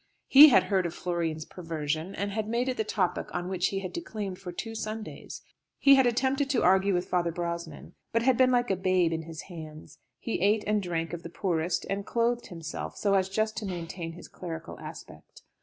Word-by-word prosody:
He 295 +3 +10
had 205 -8 +6
heard 185 -1 +1
of 170 - -8
Florian's 165 -3 -2
perversion, 160 0 -4
and 200 +1 -2
had 215 +1 -2
made 240 +3 0
it 255 - 0
the 220 - +1
topic 190 -4 -1
on 175 +1 -2
which 185 0 +1
he 195 -1 -2
had 185 - -6
declaimed 210 - -5
for 185 -2 -7
two 225 +6 -5
Sundays. 215 0 -6 0.3
He 275 - +7
had 265 -2 +6
attempted 265 +3 +1
to 260 -4 +2
argue 190 +1 +4
with 175 +1 -1
Father 175 -2 +1
Brosnan, 170 -2 -5 0.2
but 230 0 +1
had 260 0 +4
been 255 +1 +5
like 245 -3 +2
a - - +2
babe 185 -2 +2
in 160 - -2
his 160 -1 -8
hands. 155 -3 -10 0.2
He 230 - -3
ate 210 +2 +3
and 210 0 +1
drank 165 -3 -3
of 170 - -4
the 170 - -8
poorest, 170 -1 -1
and 200 +1 -2
clothed 235 +2 0
himself 165 -4 -6
so 200 -1 +1
as 190 -1 +2
just 215 +2 0
to 215 - -3
maintain 170 -2 -5
his 175 - -11
clerical 165 -2 -7
aspect. - - -11
185 Hz, 210 wpm, -28 LUFS, 170-220 Hz, 0.3 s, He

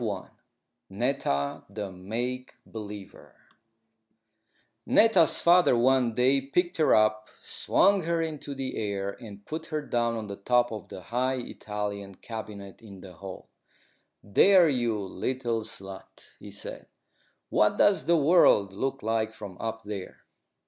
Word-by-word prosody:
NETTA, 95 - -1
THE 100 -1 -5
MAKE 120 +8 -4
BELIEVER 105 -3 -9 1.5
Netta's 195 -8 +5
father 175 -7 +5
one 125 -1 +3
day 130 +3 +3
picked 175 +7 -1
her 155 - +4
up, 110 0 +2
swung 200 0 +2
her 170 0 0
into 155 -3 -4
the 135 -1 -4
air, 100 -2 -2
and 100 -3 -11
put 160 +1 -6
her 155 -2 -2
down 120 -3 0
on 110 - -5
the 100 -1 -7
top 120 +4 +2
of 110 -2 -7
the - - -8
high 125 +6 -1
Italian 105 -5 -5
cabinet 105 -2 -8
in 100 -4 -12
the 90 -1 -11
hall. 95 +2 -10 0.7
"There, 180 - +6
you 120 -6 0
little 115 +4 -2
slut," 95 -3 -10
he - - -10
said, - - -7 0.6
"what - - +3
does 205 - +3
the 170 0 +5
world 140 - +4
look 135 +6 -3
like 110 0 0
from 105 -4 -9
up 115 0 -4
there?" 100 -3 -7
115 Hz, 135 wpm, -27 LUFS, 100-135 Hz, 1.5 s, There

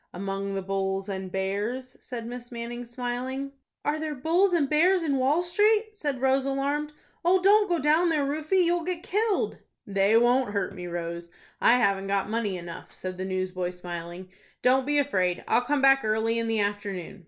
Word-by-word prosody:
"Among 195 +1 -3
the 195 - -3
bulls 195 0 -2
and 190 -1 -4
bears," 205 +7 -3
said 240 -2 -6
Miss 245 +1 -8
Manning, 240 +1 -6
smiling. 250 +3 -4 0.3
"Are 300 +1 0
there 310 -1 -3
bulls 340 +8 +2
and 330 -5 +2
bears 345 +5 +3
in 285 -4 +1
Wall 280 +7 +2
Street?" 420 +5 +2
said 290 -9 -3
Rose, 265 0 +3
alarmed. 280 +2 -1 0.3
"Oh, 365 +2 +4
don't 410 +2 +5
go 345 - +2
down 315 +4 +3
there, 300 -3 +1
Rufie. 310 +6 +1
You'll 345 0 +1
get 350 0 -3
killed." 420 +1 0 0.3
"They 200 +2 +3
won't 240 -1 +3
hurt 200 -2 -1
me, 180 -2 -7
Rose. 170 0 -5 0.3
I - - +6
haven't 200 -5 +2
got 200 +1 0
money 215 -4 -1
enough," 170 -1 -9
said 185 0 -7
the 185 - -2
newsboy, 185 -1 -2
smiling. 175 0 -7 0.3
"Don't 260 +1 +3
be 290 0 +2
afraid. 185 -11 +1
I'll - - +3
come 280 +2 0
back 270 0 +6
early 220 +1 +1
in 230 - -1
the 225 -1 0
afternoon." 200 -2 -3
245 Hz, 185 wpm, -27 LUFS, 195-295 Hz, 0.3 s, I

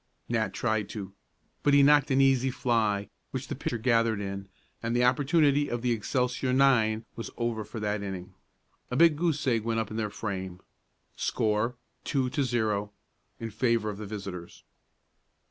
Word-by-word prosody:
Nat 115 -2 0
tried 110 -4 -1
to, 100 -3 -6 0.5
but 145 -1 +4
he 140 - +7
knocked 145 0 +5
an 135 0 +4
easy 135 -1 +4
fly, 110 -5 0 0.2
which - - -5
the - - -2
pitcher 120 - -3
gathered 115 -2 +2
in, 100 -1 -5 0.3
and 115 +1 -1
the 120 - +3
opportunity 145 +3 +3
of 120 0 -3
the 125 - +2
Excelsior 125 +3 0
nine 120 -5 +3
was 115 - -5
over 115 -2 -1
for 105 +2 -7
that 105 -1 -1
inning. 95 -2 -6 0.6
A 125 - -3
big 165 +2 +6
goose 155 -2 0
egg 115 -4 +2
went 115 0 0
up 110 -1 -3
in 110 - -4
their 110 -2 -1
frame. 95 -4 -5 0.6
Score: 110 +3 0 0.3
2 130 -3 0
0, 110 -7 0 0.5
in 115 -1 -5
favor 115 -1 +1
of 100 - -9
the 105 - -6
visitors. 95 -4 -7
115 Hz, 165 wpm, -28 LUFS, 105-130 Hz, 0.6 s, he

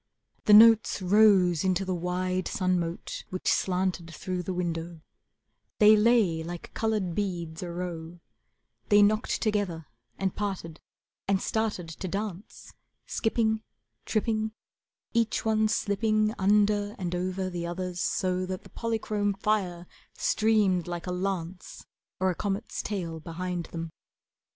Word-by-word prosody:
The 210 - +6
notes 225 0 +7
rose 190 -3 +4
into 190 0 +1
the 185 - -1
wide 180 +1 -1
sun 185 -1 +1
mote 170 0 -5
Which 185 - -5
slanted 180 -2 0
through 180 +1 -4
the 180 - -4
window, 170 -2 -3 0.8
They 215 +1 +7
lay 210 -7 +3
like 170 +1 -7
coloured 215 -6 -1
beads 170 -5 -3
a 180 - -5
row, 170 -1 -6 0.7
They 205 0 +7
knocked 215 +3 +1
together 200 -7 -1 0.3
and 190 -1 -1
parted, 190 -6 -4 0.5
And 195 -1 +2
started 215 -5 -1
to 175 +4 -6
dance, 200 +1 -6 0.3
Skipping, 220 -1 0 0.5
tripping, 220 0 0 0.6
each 230 -2 +1
one 220 0 +3
slipping 215 0 +1
Under 205 +1 +2
and 180 -2 -3
over 185 +1 -2
the 170 -1 -3
others 180 0 -4
so 185 0 0
That 185 0 -5
the - - -16
polychrome 215 -3 -1
fire 195 -4 -1 0.3
streamed 205 -6 +2
like 175 -1 -4
a 180 - -3
lance 180 -1 -4 0.3
Or 190 0 +2
a - - -5
comet's 200 +4 -3
tail, 170 -6 -4
Behind 175 +1 -4
them. 165 -1 -6
185 Hz, 130 wpm, -28 LUFS, 175-210 Hz, 0.8 s, notes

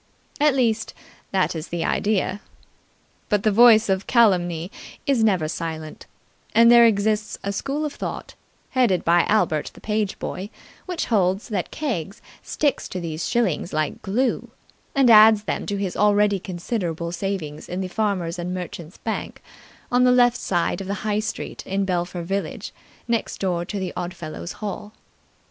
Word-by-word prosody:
At 295 -2 +4
least, 225 -4 0 0.3
that 190 -2 0
is 160 +1 -5
the 170 -1 -3
idea. 205 -1 0 0.9
But 205 -2 +1
the 215 - +3
voice 225 0 +7
of 190 0 0
calumny 180 -7 +2 0.3
is 265 -5 +2
never 185 -8 +2
silent, 160 -1 -6 0.5
and 235 +1 +7
there 235 -1 +8
exists 215 0 0
a 200 - -2
school 275 +8 -2
of 295 - -4
thought, - - -6 0.4
headed 235 -9 +2
by 170 +1 +4
Albert, 160 -8 +1
the - - -13
page 210 -2 -1
boy, 195 +3 -5 0.4
which 360 -2 -2
holds 195 -2 +1
that 200 -5 -2
Keggs 225 - -4 0.2
sticks 290 -2 -1
to 185 - -5
these 165 -2 -4
shillings 205 -7 0
like 155 -1 -1
glue, 235 +7 -1 0.5
and 275 -2 +4
adds 215 -2 +8
them - - -3
to 205 - -1
his 195 -2 -3
already 205 -1 +3
considerable 175 -2 -3
savings 175 -5 -4
in 180 +2 -3
the 185 - -2
Farmers' 185 -4 -2
and 180 +1 -3
Merchants' 175 -2 -7
Bank, - - -4 0.5
on 245 0 +4
the 250 - +5
left 245 -1 +4
side 175 -2 -1
of 190 - -7
the 200 +2 -4
High 210 -1 +1
Street 220 +1 -5
in 195 +1 0
Belpher 175 -1 -2
village, 195 +3 -4 0.3
next 235 -1 -1
door 175 -3 -1
to 205 - -5
the 190 -2 -3
Oddfellows' 175 -2 -6
Hall. 210 +1 -5
200 Hz, 160 wpm, -23 LUFS, 175-220 Hz, 0.9 s, there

